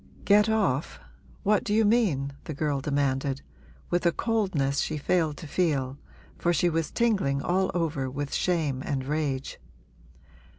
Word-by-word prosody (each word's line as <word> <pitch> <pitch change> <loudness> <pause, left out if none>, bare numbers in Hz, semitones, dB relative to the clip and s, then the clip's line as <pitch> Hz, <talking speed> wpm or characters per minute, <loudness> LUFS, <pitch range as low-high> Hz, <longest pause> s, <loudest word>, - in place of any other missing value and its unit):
'Get 210 +1 +5
off 195 -11 0 0.4
what 210 0 +3
do 210 -4 0
you 220 0 +4
mean?' 180 - +2
the 155 - -5
girl 145 -2 -1
demanded, 140 -1 0 0.5
with 175 0 +1
a 170 - +4
coldness 175 -12 0
she 155 - -1
failed 155 0 +1
to 165 - -8
feel, 145 -5 0 0.4
for 175 - +2
she 175 0 +2
was 165 -1 -1
tingling 190 -13 +1
all 190 +1 +1
over 155 -6 -1
with 145 +2 -4
shame 155 -7 0
and 135 -2 -2
rage. 145 -2 -2
155 Hz, 145 wpm, -27 LUFS, 140-185 Hz, 0.5 s, Get